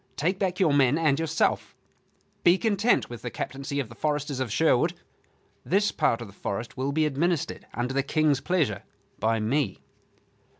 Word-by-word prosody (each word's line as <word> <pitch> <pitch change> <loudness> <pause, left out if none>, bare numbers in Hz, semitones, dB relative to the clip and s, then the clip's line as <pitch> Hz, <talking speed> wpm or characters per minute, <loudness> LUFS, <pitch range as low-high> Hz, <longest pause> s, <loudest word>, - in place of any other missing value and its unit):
Take 180 +6 0
back 185 -2 -1
your 170 -7 +3
men 140 0 +4
and 155 -3 +2
yourself; 165 -1 0 0.7
be 175 +2 +6
content 220 +2 +2
with 120 -1 -9
the 120 - -4
captaincy 135 +4 -4
of 135 - -2
the 115 - -12
foresters 145 +1 -2
of 130 -4 -2
Sherwood. 155 -2 +2 0.7
This 205 +3 +2
part 135 -7 +1
of 115 - -6
the 100 - -14
forest 100 +3 -5
will 135 +2 -1
be 155 +2 +2
administered, 155 +3 -1
under 125 +2 -2
the 135 - +2
King's 145 0 +1
pleasure, 145 - 0 0.4
by 110 +1 +1
me." 130 +6 0
145 Hz, 170 wpm, -26 LUFS, 125-165 Hz, 0.7 s, be